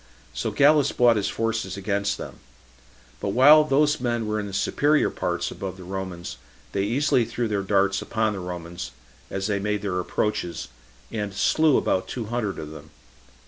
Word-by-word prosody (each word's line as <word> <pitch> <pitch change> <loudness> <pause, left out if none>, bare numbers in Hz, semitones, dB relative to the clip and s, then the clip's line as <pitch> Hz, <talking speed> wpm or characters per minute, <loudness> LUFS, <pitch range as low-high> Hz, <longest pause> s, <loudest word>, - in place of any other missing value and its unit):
So - - -2
Gallus 145 0 +4
brought 120 -1 +4
his 105 -2 0
forces 110 -4 -2
against 100 +1 -1
them; - - -8 0.8
but 100 - -2
while 150 +6 +8
those 150 +1 +2
men 120 -2 -1
were 105 0 -1
in 105 - -4
the - - -7
superior 145 +9 +2
parts - - -2
above 95 -1 -6
the 95 - -10
Romans, 90 -7 -6 0.3
they 100 - -1
easily 125 +4 +2
threw 115 +1 -2
their 105 -2 -1
darts 100 0 +1
upon 110 -1 0
the 100 - -5
Romans, 85 -1 -6 0.4
as 95 0 -3
they 100 -1 0
made 105 +1 -2
their 95 -3 -1
approaches, 90 -1 -2 0.4
and 105 -2 -4
slew 155 +7 +3
about 95 0 0
two 120 -3 -4
hundred 110 -3 -2
of 75 0 -7
them. 80 0 -11
105 Hz, 175 wpm, -24 LUFS, 95-120 Hz, 0.8 s, while